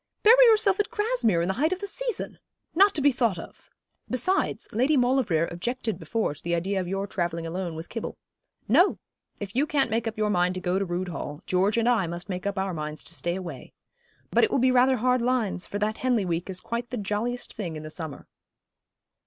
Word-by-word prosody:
'Bury -, -, +8 dB
yourself 425 Hz, -3 st, +4 dB
at 415 Hz, -, +1 dB
Grasmere 420 Hz, -, +1 dB
in -, -, -1 dB
the 190 Hz, -, +1 dB
height 315 Hz, +3 st, +3 dB
of 370 Hz, -, -1 dB
the 405 Hz, -, -4 dB
season! 480 Hz, +2 st, -3 dB, 0.3 s
Not 395 Hz, +4 st, +5 dB
to 300 Hz, -, +2 dB
be 285 Hz, -, +6 dB
thought 235 Hz, -7 st, +1 dB
of! 165 Hz, -, -11 dB, 0.4 s
Besides, 370 Hz, +10 st, 0 dB
Lady 260 Hz, +7 st, +2 dB
Maulevrier 245 Hz, -10 st, +2 dB
objected 220 Hz, +2 st, -3 dB
before 170 Hz, +2 st, -1 dB
to 150 Hz, -, -13 dB
the 170 Hz, 0 st, -1 dB
idea 190 Hz, +3 st, -1 dB
of 180 Hz, -, -5 dB
your 195 Hz, +2 st, -2 dB
travelling 170 Hz, -4 st, -2 dB
alone 170 Hz, 0 st, -4 dB
with 160 Hz, +2 st, -7 dB
Kibble. 230 Hz, -, -5 dB, 0.5 s
No! -, -, +4 dB, 0.4 s
if 200 Hz, 0 st, -6 dB
you 285 Hz, +4 st, +2 dB
can't 280 Hz, -6 st, +1 dB
make 225 Hz, +1 st, 0 dB
up 225 Hz, 0 st, -4 dB
your 210 Hz, -1 st, +1 dB
mind 180 Hz, -1 st, +2 dB
to -, -, -3 dB
go 180 Hz, +1 st, 0 dB
to 195 Hz, -, -1 dB
Rood 180 Hz, +1 st, -3 dB
Hall, 150 Hz, -1 st, -6 dB
George 195 Hz, +4 st, +2 dB
and 230 Hz, 0 st, +2 dB
I 225 Hz, -7 st, +3 dB
must 175 Hz, +2 st, -6 dB
make 185 Hz, +1 st, -3 dB
up 200 Hz, -1 st, -2 dB
our 190 Hz, -1 st, -1 dB
minds 155 Hz, -1 st, -5 dB
to -, -, -1 dB
stay 170 Hz, +1 st, -2 dB
away. 170 Hz, -9 st, -7 dB, 0.6 s
But -, -, +4 dB
it 445 Hz, -, +4 dB
will -, -, +1 dB
be 255 Hz, 0 st, +4 dB
rather 255 Hz, +1 st, +4 dB
hard 250 Hz, +1 st, +2 dB
lines; 235 Hz, -7 st, 0 dB
for 205 Hz, -, -4 dB
that 215 Hz, +1 st, -1 dB
Henley 245 Hz, -6 st, +1 dB
week 170 Hz, +1 st, -2 dB
is 185 Hz, -1 st, -4 dB
quite 235 Hz, +1 st, -4 dB
the 250 Hz, -, -4 dB
jolliest 215 Hz, +4 st, -3 dB
thing 175 Hz, -7 st, -5 dB
in 155 Hz, -, -7 dB
the 155 Hz, -, -7 dB
summer.' 160 Hz, -4 st, -7 dB
210 Hz, 225 wpm, -26 LUFS, 175-255 Hz, 0.6 s, Bury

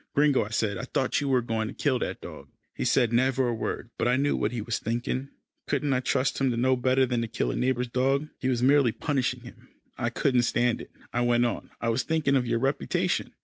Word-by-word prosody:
"Gringo," 145 Hz, -1 st, +4 dB
I 105 Hz, -, -7 dB
said, 110 Hz, -3 st, -1 dB
"I -, -, -4 dB
thought 130 Hz, +2 st, 0 dB
you 140 Hz, -, -1 dB
were 130 Hz, -3 st, +2 dB
going 110 Hz, -2 st, -1 dB
to -, -, -8 dB
kill 130 Hz, -4 st, +1 dB
that -, -, -4 dB
dog." -, -, -10 dB, 0.2 s
He -, -, -4 dB
said 120 Hz, -1 st, +2 dB
never 130 Hz, +1 st, +2 dB
a -, -, 0 dB
word, 115 Hz, +1 st, -4 dB
but -, -, +1 dB
I 125 Hz, -, +3 dB
knew 145 Hz, +2 st, +1 dB
what -, -, 0 dB
he 120 Hz, -, -3 dB
was 110 Hz, +1 st, -2 dB
thinking 120 Hz, +4 st, -2 dB, 0.4 s
couldn't 145 Hz, -2 st, 0 dB
I 125 Hz, -, +2 dB
trust 130 Hz, +1 st, 0 dB
him 135 Hz, -, +3 dB
to 120 Hz, -, -1 dB
know 130 Hz, +2 st, +3 dB
better 130 Hz, +1 st, +2 dB
than 120 Hz, -2 st, -1 dB
to 115 Hz, -, -2 dB
kill 110 Hz, -, -1 dB
a -, -, -4 dB
neighbour's 125 Hz, -1 st, 0 dB
dog? 135 Hz, +4 st, +1 dB
He 130 Hz, -, -1 dB
was 125 Hz, -1 st, 0 dB
merely 135 Hz, -3 st, +4 dB
punishing 125 Hz, -4 st, -1 dB
him. 120 Hz, +1 st, -14 dB, 0.3 s
"I 120 Hz, -1 st, 0 dB
couldn't 125 Hz, +1 st, +2 dB
stand 120 Hz, 0 st, +1 dB
it," -, -, -11 dB, 0.2 s
I 120 Hz, -, +1 dB
went 120 Hz, 0 st, +3 dB
on, 120 Hz, -, -3 dB
"I 115 Hz, -, -1 dB
was 115 Hz, +3 st, +1 dB
thinking 155 Hz, -4 st, +1 dB
of 125 Hz, -2 st, +1 dB
your 115 Hz, 0 st, +1 dB
reputation." 135 Hz, +4 st, -1 dB
125 Hz, 245 wpm, -27 LUFS, 120-135 Hz, 0.4 s, Gringo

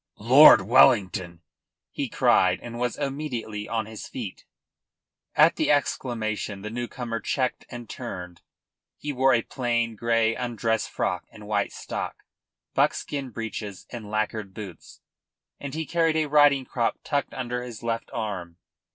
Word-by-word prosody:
"Lord 130 Hz, +8 st, +8 dB
Wellington!" 95 Hz, -6 st, +3 dB, 0.5 s
he -, -, -3 dB
cried, -, -, +3 dB
and 120 Hz, 0 st, -7 dB
was 125 Hz, -1 st, -1 dB
immediately 135 Hz, -7 st, -4 dB
on 110 Hz, -2 st, -1 dB
his 110 Hz, 0 st, -8 dB
feet. 110 Hz, -7 st, -7 dB, 0.9 s
At -, -, +5 dB
the -, -, +1 dB
exclamation 110 Hz, -7 st, -1 dB
the 105 Hz, -, -5 dB
new 120 Hz, +1 st, -3 dB
comer 115 Hz, -3 st, -4 dB
checked 130 Hz, +3 st, -2 dB
and 120 Hz, -1 st, -8 dB
turned. 90 Hz, -8 st, -7 dB, 0.6 s
He 145 Hz, 0 st, -4 dB
wore 130 Hz, 0 st, +4 dB
a 115 Hz, -, +1 dB
plain 120 Hz, -3 st, -1 dB
grey 115 Hz, 0 st, +2 dB
undress 115 Hz, -2 st, -1 dB
frock -, -, -2 dB
and 105 Hz, -, -13 dB
white 105 Hz, -1 st, 0 dB
stock, -, -, -6 dB, 0.5 s
buckskin 140 Hz, -3 st, 0 dB
breeches 110 Hz, -4 st, -6 dB
and 115 Hz, -4 st, -7 dB
lacquered 110 Hz, -2 st, -2 dB
boots, 100 Hz, -5 st, -10 dB, 0.6 s
and 140 Hz, 0 st, -6 dB
he 160 Hz, 0 st, -2 dB
carried 165 Hz, -1 st, +1 dB
a 155 Hz, -, +2 dB
riding 145 Hz, -2 st, +4 dB
crop 120 Hz, -2 st, -1 dB
tucked 145 Hz, -2 st, -2 dB
under 125 Hz, -1 st, -3 dB
his 120 Hz, -3 st, -8 dB
left 115 Hz, -1 st, -2 dB
arm. 95 Hz, -6 st, -4 dB
115 Hz, 145 wpm, -26 LUFS, 110-130 Hz, 0.9 s, Lord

